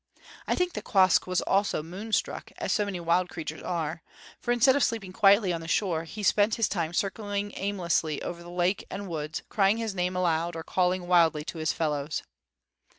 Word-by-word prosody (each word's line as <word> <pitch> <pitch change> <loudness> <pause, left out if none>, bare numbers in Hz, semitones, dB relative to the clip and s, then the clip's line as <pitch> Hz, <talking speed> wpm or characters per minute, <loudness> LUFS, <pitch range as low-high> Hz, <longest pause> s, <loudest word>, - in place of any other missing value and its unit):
I - - +2
think 360 -1 0
that - - -5
Quoskh 190 -6 +4
was 180 -1 +1
also 195 -5 +1
moonstruck, 195 +7 -3
as - - -1
so 210 - +1
many 195 -3 -4
wild 175 +2 +1
creatures 160 -1 -6
are; 165 -2 -3 0.4
for, 240 - -2
instead 245 +2 +5
of 285 - +2
sleeping 205 -6 -2
quietly 200 -2 +5
on 165 - -3
the 165 - -8
shore, 165 -2 0
he 210 +6 -7
spent 210 +2 +3
his 225 -3 +2
time 170 -5 -2
circling 205 +2 -2
aimlessly 175 -6 -1
over 170 0 -5
the 170 - -11
lake 180 +2 0
and 200 0 -5
woods, 155 -2 -4
crying 200 +1 +2
his 225 -3 -2
name 180 0 -1
aloud, 170 -1 0
or 165 - -5
calling 180 +1 0
wildly 165 -4 +4
to 160 - -7
his 155 0 +1
fellows. 150 -2 -2
180 Hz, 195 wpm, -28 LUFS, 165-205 Hz, 0.4 s, instead